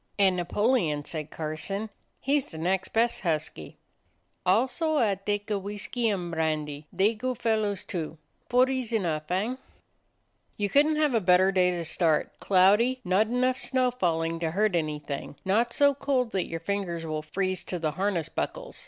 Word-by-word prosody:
"And 195 -2 +4
Napoleon," 175 - +1
said 155 -2 -3
Carson; 165 +8 -4 0.3
"he's 280 0 +1
the 160 - -10
next 180 +4 0
best 230 +1 +1
husky." 155 - -3 0.7
"Also 255 - +2
ah 220 -7 +3
taka 205 +1 -2
Whiskee 210 +4 -1
an' 180 -4 -2
Brandee; 155 -2 -2
they 195 +5 +2
good 250 +2 -3
fellas, 215 -4 0
too. 165 -2 -5 0.3
Four 250 +1 +5
ees 260 -3 -2
enough, 160 -8 -1
hein?" 215 +8 -1 1.0
"You 205 -1 -1
couldn't 300 +2 +4
have 300 -3 +2
a 225 - +2
better 185 +1 +4
day 185 -1 +3
to 175 -2 -2
start; 160 -2 +1
cloudy, 205 +7 +4
not 190 +4 +3
enough 255 +2 +1
snow 255 -1 +1
falling 165 -7 -1
to 165 -1 -1
hurt 200 +3 +1
any 155 -3 0
thing, 145 -1 -6
not 225 +5 +2
so 285 +3 +4
cold 270 -4 0
that 190 -2 -1
your 165 0 -4
fingers 175 -3 -3
will 155 -1 -3
freeze 185 +3 -1
to 180 - -3
the 160 -2 -1
harness 180 -1 -1
buckles. - - -4
195 Hz, 165 wpm, -27 LUFS, 165-235 Hz, 1.0 s, Four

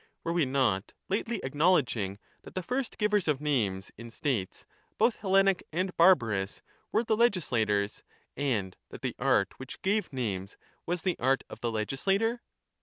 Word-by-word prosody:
AVere 170 - 0
we 170 -4 +3
not 130 -8 +1 0.2
lately 220 +3 -1
acknowledging 130 - +2 0.2
that - - -13
the 185 - -2
first 250 +5 -2
givers 210 -3 +2
of 150 -3 +2
names 110 -11 0
in 115 0 -8
states, 115 -6 -2 0.3
both 235 - +3
Hellenic 195 -1 +3
and 185 +3 -1
barbarous, 115 - +3 0.3
were 220 - +2
the 220 -1 +1
legislators, 120 - +1 0.3
and 110 -10 -1
that - - -11
the - - -1
art 100 - +2
which 130 +2 -8
gave 205 -1 +1
names 100 -7 -3 0.3
was 175 0 -1
the 185 -2 0
art 135 +2 +2
of - - -8
the 120 - -1
legislator 195 - 0
145 Hz, 155 wpm, -29 LUFS, -, 0.3 s, we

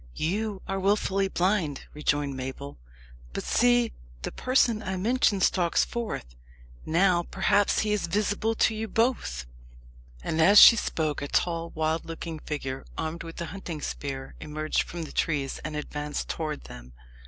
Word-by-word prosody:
"You 200 +4 -2
are 195 0 -2
wilfully 195 0 +1
blind," 180 -6 0
rejoined 145 -2 0
Mabel. 135 - -6 0.5
"But - - -3
see, 240 -1 +3 0.3
the - - -3
person 255 -4 +2
I 190 -3 -3
mentioned 205 -1 +2
stalks 175 -3 +3
forth. 220 - -5 0.5
Now, 175 +2 +3
perhaps, 200 +1 +2
he 210 -1 0
is 205 -4 -1
visible 210 +4 0
to 220 - +3
you 220 +1 -3
both." 225 - 0 0.8
And 160 0 0
as 200 +5 +8
she 230 - +11
spoke, 155 -9 -1
a 140 - -3
tall 170 +2 0
wild 160 +1 0
looking 165 -1 -6
figure, 135 -3 -4
armed 160 +1 -3
with 165 0 -8
a - - -2
hunting 180 -5 -6
spear, 135 -2 -5
emerged 155 0 -1
from 170 -1 -5
the 155 - -8
trees 140 -4 -1
and 155 0 -4
advanced 150 0 -4
towards 155 -3 -3
them. - - -11
170 Hz, 155 wpm, -27 LUFS, 150-205 Hz, 0.8 s, she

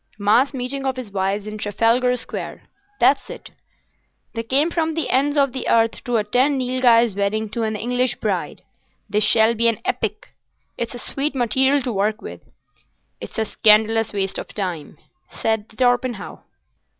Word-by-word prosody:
Mass 220 +7 +3
meeting 265 +1 -4
of 260 - -1
his 250 -5 -7
wives 195 +1 -1
in 215 0 -7
Trafalgar 230 +5 +2
Square. - - -6 0.4
That's - - +3
it. - - -10 0.8
They 230 - -2
came 275 +8 +1
from 320 -2 -1
the 325 - -2
ends 285 +3 +1
of 275 -2 +3
the 260 - -3
earth 225 0 +2
to 245 -1 +1
attend 250 +7 +1
Nilghai's 245 -3 +3
wedding 205 +2 -1
to 235 - -3
an 220 -1 -1
English 245 +3 0
bride. - - -3 0.4
This 210 +1 +1
shall 220 +2 +4
be 235 +1 +2
an 230 -2 +2
epic. 380 - -3 0.5
It's 235 +1 -4
a 245 - -7
sweet 280 +1 -1
material 265 +3 +2
to 245 - -2
work 210 +2 0
with." - - -9 0.8
"It's - - -9
a 220 - +1
scandalous 220 +1 +3
waste 195 -2 -2
of - - -7
time," 180 -7 -5 0.3
said 220 -1 -2
Torpenhow. 245 -2 -1
230 Hz, 160 wpm, -21 LUFS, 215-255 Hz, 0.8 s, shall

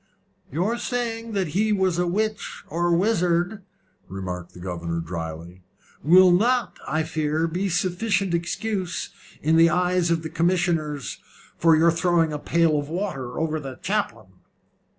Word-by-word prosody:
"Your 195 - 0
saying 230 -2 -3
that 190 -5 0
he 210 +7 +1
was 190 -4 +1
a 180 - +1
witch 215 +4 -2
or 175 +2 0
wizard," 180 +1 +1 0.5
remarked 90 -2 -6
the - - -11
governor, 85 -2 -4
dryly, 85 +1 -6 0.4
"will 180 +4 +7
not, 240 +7 +2
I 155 +3 0
fear, 155 0 -1
be 185 +4 -2
sufficient 185 +2 0
excuse, 180 +2 -2 0.3
in 160 +2 +3
the 165 0 +6
eyes 180 0 +1
of 165 -1 +1
the 160 - -4
commissioners, 165 -4 0 0.4
for 165 -1 +4
your 165 +2 +5
throwing 170 -2 +2
a 150 - -3
pail 165 -1 +2
of 145 0 -6
water 155 -9 -3
over 160 -1 -1
the 135 -3 -7
chaplain." 200 - -2
170 Hz, 145 wpm, -24 LUFS, 150-190 Hz, 0.5 s, will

